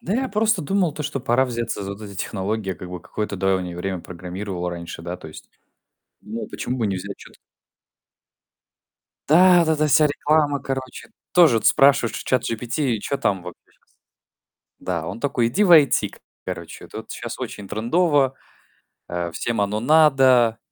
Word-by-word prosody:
Да 195 - -2
я 260 +1 0
просто 215 -2 +1
думал 180 0 +1
то, 150 - -5
что 145 -2 -3
пора 125 +1 +2
взяться 120 -4 -3
за 100 0 -5
вот 100 - -11
эти 100 -2 -9
технологии, 100 +1 -3
я 95 - -1
как 90 +2 -9
бы 90 -1 -7
какое-то 105 +3 -4
давнее 95 -2 -1
время 95 0 -3
программировал 90 +1 -6
раньше, 85 -1 -7
да, 90 +1 -5
то 80 - -11
есть 75 - -13 0.7
думал, 110 +2 -6
почему 125 - -4
бы 115 -4 0
не 100 - -1
взять 100 +2 -6
чё-то? - - -15 1.9
Да, 180 +3 +7
вот - - -3
эта 155 -1 +2
вся 150 +1 +5
реклама, 145 -1 +1
короче. 130 - -6 0.2
Тоже 160 -10 +6
от 105 - -2
спрашиваешь 135 -6 +3
у - - 0
ChatGPT: 120 +1 -1
"Чё 140 +7 -3
там 95 -8 -1
вот 90 -1 -8
я - - -30
щас?" - - -34 1.0
Да, 85 -3 -3
он 95 +7 -6
такой: 120 -4 +1
"Иди 200 - +2
в 180 - +5
IT, 150 -4 +5 0.3
короче, - - -7
тут - - -9
щас - - -6
очень 100 -2 -7
трендово, 135 - +1 0.8
э, 85 -1 -3
всем 115 +5 -2
оно 100 +1 -1
надо. 130 -4 +4
115 Hz, 175 wpm, -22 LUFS, 95-145 Hz, 1.9 s, Да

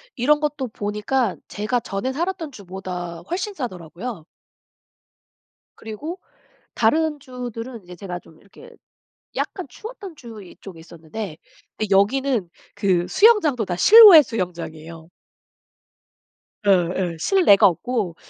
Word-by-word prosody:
이런 295 +4 +2
것도 295 -3 -2
보니까 210 +3 -2
제가 215 +4 -2
전에 215 +5 -4
살았던 330 0 -3
주보다 180 -5 -7
훨씬 375 +4 -3
싸더라고요. 185 - -7 1.5
그리고 295 - -7 0.6
다른 300 +6 +1
주들은 245 -2 -8
이제 180 0 -12
제가 180 -1 -6
좀 160 - -20
이렇게 455 - -16 0.7
약간 370 -6 -3
추웠던 405 - -10
주 225 -5 -11
이쪽에 180 -1 -13
있었는데 165 +2 -8 0.4
근데 215 - -3
여기는 230 0 +1 0.3
그 185 -4 +1
수영장도 380 - +4
다 175 - -3
실외 405 - +9
수영장이에요. 165 - -6 1.6
예예. 180 -2 +1
실내가 355 - +5
없고 195 -1 -3
220 Hz, 260 characters per minute, -22 LUFS, 180-285 Hz, 1.6 s, 실외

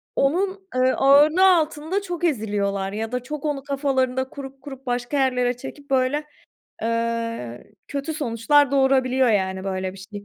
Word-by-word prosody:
onun, 380 +7 0
eee, 255 0 +3
ağırlığı 300 +7 +5
altında 320 +4 -1
çok 350 -2 -6
eziliyorlar 205 - -1
ya 220 +2 -4
da 250 0 -2
çok 300 +2 -6
onu 280 -2 -2
kafalarında 265 -2 0
kurup 270 -1 -9
kurup 270 -1 -10
başka 245 +3 -2
yerlere 250 -2 +1
çekip 285 +2 -10
böyle, 265 +3 +1 0.6
eee, 230 - -2 0.2
kötü 285 +3 -4
sonuçlar 280 0 +2
doğurabiliyor, 265 -2 +3
yani, 190 -3 0
böyle 190 -1 -3
bir 195 - -13
şey. 205 0 -7
260 Hz, 145 wpm, -23 LUFS, 230-290 Hz, 0.6 s, ağırlığı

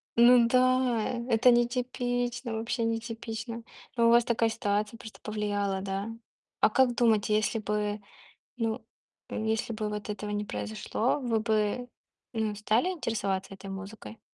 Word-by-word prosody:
ну 240 0 +7
да! 255 -2 +2
Это 245 +1 +6
нетипично, 245 0 0
вообще, 225 +2 -2
нетипично. 230 0 -4 0.3
Но, 235 -1 +4
у - - +6
вас 235 +1 +6
такая 230 -2 +2
ситуация 210 0 -1
просто 220 -1 -11
повлияла, 205 -2 -1
да? 195 +2 -3 0.5
А - - +5
как 255 -2 +3
думаете, 220 -3 +3
если 215 +1 +1
бы, 210 0 -2 0.6
ну, 225 0 -2 0.4
э, - - -5
если 225 +1 0
бы 215 -1 -2
вот 210 0 -5
этого 210 0 -4
не 210 0 -2
произошло, 110 - -1
вы 235 -4 0
бы, 220 +2 0 0.5
ну, 220 -2 -1
стали 215 - +2
интересоваться 200 - -2
этой 195 0 -9
музыкой 200 +3 -8
225 Hz, 140 wpm, -29 LUFS, 210-240 Hz, 0.6 s, ну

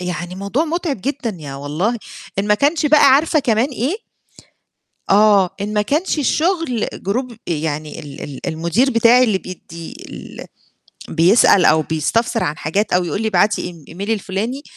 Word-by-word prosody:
يعني 180 0 -4
موضوع 200 - -1
متعب 325 - -2
جدًا 250 -4 -3
يا 140 -2 -7
والله، 155 - -2 0.4
إن 200 - 0
ما 210 - +5
كانش 295 +6 +1
بقى 295 0 +5
عارفة 310 +3 +3
كمان 235 0 +1
إيه؟ 280 - -3 1.1
آه، 200 -2 +5
إن 210 +1 -3
ما 210 - +2
كانش 300 - 0
الشغل 315 - 0 0.2
group 245 +2 -2
يعني 155 -1 -3
ال 145 0 -10
ال 140 -3 -7
المدير 170 - +1
بتاعي 235 +2 +5
اللي 215 -5 +2
بيدّي 170 -3 -9 0.2
ال - - -9 0.6
بيسأل 180 +3 +4
أو 155 0 +5
بيستفسر 225 +10 0
عن 150 +1 -2
حاجات 200 +8 -1
أو 180 0 +3
يقول 200 +5 -3
لي 220 - 0
ابعتي 205 +1 +2
إيم 170 -4 -8
email 200 +6 -5
الفلاني، 220 +6 -2
210 Hz, 160 wpm, -18 LUFS, 170-255 Hz, 1.1 s, ما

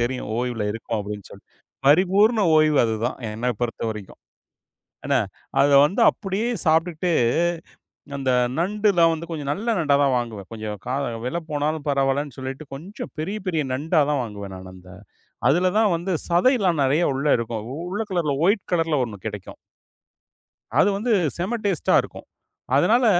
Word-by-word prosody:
தெரியும் 120 -2 -2
ஓய்வுல 120 -4 -2
இருக்கோம் 115 0 -4
அப்டின்னு 105 -1 -7
சொல்லி. - - -14 0.4
பரிபூரண 195 - +4 0.2
ஓய்வு 155 -2 +4
அதுதான், 115 +2 -1
என்னப் 115 +1 -3
பொறுத்தவரைக்கும். 110 -4 -4 0.9
என்னா! - - +2 0.4
அத 145 - +5 0.2
வந்து 180 +7 -1
அப்டியே 200 +4 -2 0.2
சாப்பிட்டுட்டு, 165 +2 +1 1.1
அந்த 135 -2 -1 0.3
நண்டுலாம் 185 -2 +3
வந்து 165 +1 -5
கொஞ்சம் 150 -4 -4
நல்ல 205 +9 -5
நண்டாதான் 140 -3 +3
வாங்குவேன். 110 -5 -6
கொஞ்சம் 110 -2 -5
கா 125 - -1 0.3
வில 130 - -2
போனாலும் 150 +1 -2
பரவாயில்லன்னு 140 -1 0
சொல்லிட்டு 135 +3 -6
கொஞ்சம் 180 +10 -8
பெரிய, 195 +7 -3
பெரிய 160 -4 0
நண்டாதான் 150 0 +1
வாங்குவேன் 100 -3 -8
நானு 95 0 -10
அந்த. 90 0 -15 0.6
அதுலதான் 185 +5 +3
வந்து 180 +3 -2 0.2
சதைலாம் 180 - +3
நறைய 145 +6 +2
உள்ள 135 +3 -2
இருக்கும். 115 -2 -4 0.3
உள்ள 205 +3 -2
கலர்ல 165 -6 0
ஒயிட் 200 +1 +2
கலர்ல 165 -3 +1
ஒண்ணு 110 -5 -6
கிடைக்கும். - - -8 1.2
அது 190 - +5
வந்து 230 +3 -1 0.3
செம 195 +8 -1
டேஸ்ட்டா 195 -6 +1
இருக்கும். - - -11 0.5
அதனால, 230 - +4
150 Hz, 135 wpm, -23 LUFS, 120-180 Hz, 1.2 s, அத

